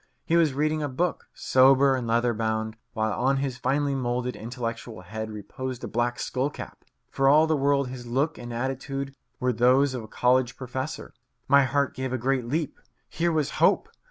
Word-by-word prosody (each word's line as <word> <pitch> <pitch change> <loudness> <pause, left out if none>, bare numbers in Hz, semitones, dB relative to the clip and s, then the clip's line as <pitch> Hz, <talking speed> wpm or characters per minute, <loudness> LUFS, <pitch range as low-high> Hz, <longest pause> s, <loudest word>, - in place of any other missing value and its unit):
He 165 - +1
was 160 -5 +3
reading 155 +2 0
a 145 - -2
book, 170 +7 -2
sober 135 +1 +5
and 125 -3 -3
leather 120 +1 +2
bound, 110 0 -2 0.2
while 110 -2 0
on 135 +2 +1
his 135 -2 -3
finely 140 +1 0
moulded, 125 -1 -2
intellectual 115 -2 -6
head 110 +4 -6
reposed 120 +4 -6
a - - -3
black 120 +1 -1
skull 130 +2 -1
cap. - - -10 0.3
For 135 0 +3
all 155 +3 +6
the 160 0 +1
world 140 -1 +1
his 125 -1 -8
look 140 +6 0
and 120 0 -7
attitude 135 +3 -4 0.2
were 125 0 +1
those 130 +4 +4
of 125 - -4
a 110 - -10
college 125 +2 +1
professor. 130 +3 -5 0.3
My 140 0 +6
heart 140 +2 0
gave 130 -1 -4
a - - 0
great 130 0 0
leap. 155 +4 -2 0.3
Here 170 +1 0
was 155 -3 0
hope! - - +4
130 Hz, 185 wpm, -26 LUFS, 120-140 Hz, 0.3 s, all